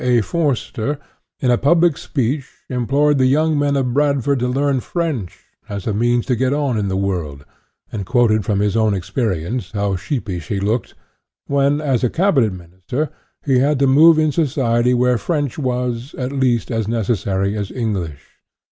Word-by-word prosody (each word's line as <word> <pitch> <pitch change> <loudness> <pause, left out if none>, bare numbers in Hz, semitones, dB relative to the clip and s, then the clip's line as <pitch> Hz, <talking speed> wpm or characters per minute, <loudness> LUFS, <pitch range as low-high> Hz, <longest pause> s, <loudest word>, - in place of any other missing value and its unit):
A. 125 -2 +3
Forster, 145 - -1 0.4
in 125 - +2
a 120 - +2
public 165 +3 +3
speech 135 +1 -2 0.2
implored 140 +4 +2
the 130 - +4
young 155 +4 +2
men 145 0 +1
of 130 -3 0
Bradford 140 -1 +1
to 125 - 0
learn 135 +1 +1
French, 145 - -3 0.3
as 100 -2 -5
a 110 - -1
means 120 +3 +1
to 125 - +1
get 130 +3 +1
on 145 -4 0
in 105 -2 -1
the 95 0 -1
world, 85 -8 -3 0.5
and 105 - -4
quoted 110 0 +2
from 100 0 0
his 105 0 +1
own 110 -2 +2
experience 100 +2 -3
how 100 -2 0
sheepish 95 - -4
he 100 - -2
looked 110 +5 -2 0.5
when, 140 +1 +2
as 135 -6 0
a 125 - +3
Cabinet 155 - +2
Minister, 95 - -5 0.3
he 135 -3 +3
had 145 +2 +2
to 140 - +2
move 155 +5 +6
in 155 -1 +2
society 125 -5 +1
where 125 -1 +2
French 145 - -2
was, 125 -1 -2
at 125 0 -3
least, 130 -4 0
as 115 -3 -1
necessary 100 -3 -1
as 100 -2 -4
Eng 115 -4 -2
lish 80 -7 -7
125 Hz, 175 wpm, -19 LUFS, 105-140 Hz, 0.5 s, move